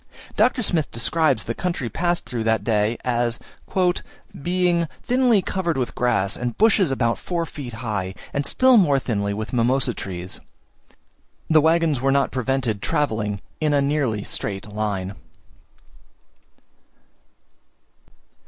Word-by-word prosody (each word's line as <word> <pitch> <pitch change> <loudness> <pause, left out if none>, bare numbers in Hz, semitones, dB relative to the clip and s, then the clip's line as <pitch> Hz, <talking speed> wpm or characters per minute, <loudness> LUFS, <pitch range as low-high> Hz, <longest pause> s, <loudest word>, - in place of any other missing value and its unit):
Dr. 250 - +3
Smith 165 -7 0
describes 125 +2 +1
the 115 - -3
country 170 -5 -2
passed 175 +9 -1
through 120 -2 -3
that 110 -2 +2
day, 110 +1 +1
as 120 -1 +1 1.0
"being 175 0 +1 0.2
thinly 245 -5 +3
covered 175 -5 -1
with 125 -2 -2
grass, 115 -5 +1
and 120 -1 -4
bushes 205 -5 +4
about 115 -3 0
four 170 -2 -2
feet 135 -6 -8
high, 95 -4 -2 0.2
and 140 - 0
still 255 - +4
more 150 -9 +4
thinly 100 -6 -1
with 105 +1 -4
mimosa 125 +1 +2
trees." 90 -2 -6 1.1
The 155 -1 +6
waggons 160 -4 +2
were 135 +1 +2
not 140 0 +2
prevented 130 -4 -1
travelling 105 -8 -1 0.2
in 150 -2 +2
a - - +4
nearly 140 -7 0
straight 100 0 -4
line. 100 -2 -2
130 Hz, 125 wpm, -23 LUFS, 110-165 Hz, 1.1 s, The